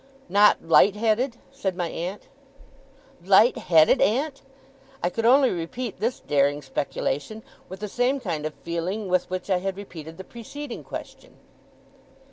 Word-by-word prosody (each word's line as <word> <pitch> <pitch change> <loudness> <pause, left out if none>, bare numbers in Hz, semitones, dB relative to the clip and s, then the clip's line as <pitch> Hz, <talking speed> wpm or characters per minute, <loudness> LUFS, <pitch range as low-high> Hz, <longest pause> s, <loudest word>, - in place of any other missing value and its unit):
'Not 205 -1 +4
light 190 +4 +6
headed?' 230 +3 0
said 200 -9 -3
my 175 -2 -1
aunt. 180 +5 -6 1.0
'Light 200 +6 +5
headed, 165 -9 +4
aunt!' 275 +6 +1 0.6
I 175 - +1
could 230 +4 0
only 265 +1 +5
repeat 195 +8 -5
this 235 +3 -1
daring 145 0 +1
speculation 145 +9 -3 0.3
with 190 +2 -9
the 210 - -3
same 245 +6 0
kind 165 - -3
of 155 - -9
feeling 185 +5 -3
with 180 0 +1
which 185 0 -4
I 185 - +4
had 190 +1 -3
repeated 165 -5 -9
the 190 - -8
preceding 240 +5 -8
question. - - -9
195 Hz, 145 wpm, -25 LUFS, 170-230 Hz, 1.0 s, light